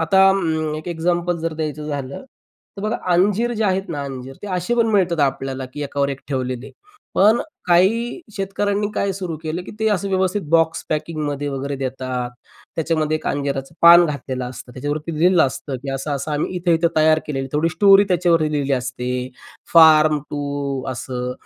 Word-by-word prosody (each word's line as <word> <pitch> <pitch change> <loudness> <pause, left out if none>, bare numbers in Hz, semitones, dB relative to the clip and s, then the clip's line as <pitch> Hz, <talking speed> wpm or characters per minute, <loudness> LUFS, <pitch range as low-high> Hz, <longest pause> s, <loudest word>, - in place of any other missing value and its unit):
आता 190 +4 +5
अं, 160 -5 0
एक 155 +3 -7
एक्झाम्पल 175 +1 -1
जर 165 0 -3
द्यायचं 155 -1 -4
झालं, 140 -2 -5 0.5
तर 195 - -7
बघा, 215 +3 -1 0.2
अंजीर 205 +7 +2
जे 220 -1 -1
आहेत 190 -1 0
ना 145 -4 -3
अंजीर, 135 -1 -7
ते - - -6
असे 180 +7 -1
पण 230 -1 +3
मिळतात 180 -6 +2
आपल्याला, 135 -1 -1
की 145 - -4
एकावर 140 0 -1
एक 135 -1 -5
ठेवलेले. 130 -1 -3 0.4
पण 215 +4 +5
अ, - - -1 0.2
काही 215 - +2 0.2
शेतकऱ्यांनी 200 +1 -1
काय 200 -1 0
सुरू 180 -4 -5
केलं, 160 +3 -3
की - - -9
ते 220 - +3
असं 200 -1 0
व्यवस्थित 190 +1 0
बॉक्स 165 -1 +2
पॅकिंगमध्ये 150 -2 -2
वगैरे 140 +1 -3
देतात. 130 -2 -3 0.5
त्याच्यामध्ये 155 -1 0
एक - - -9
अंजिराचं 140 +1 -2
पान 170 +1 +9
घातलेलं 130 -3 -4
असतं. 125 0 -11
त्याच्यावरती 150 +4 -4
लिहिलं 175 0 +5
असतं, 135 +1 -5
की 135 +2 -6
असं-असं 140 +2 -3
आम्ही 150 +5 -2
इथं-इथं 170 -1 +2
तयार 155 0 +5
केलेलं, 135 -2 -3
थोडी 150 +3 +2
स्टोरी 200 +2 +6
त्याच्यावरती 170 -4 +2
लिहिली 140 -2 0
असते. 125 -1 -2 0.6
फार्म 155 -2 +7
टू 140 -2 -3
असं. 125 0 -4
155 Hz, 170 wpm, -20 LUFS, 140-180 Hz, 0.6 s, पान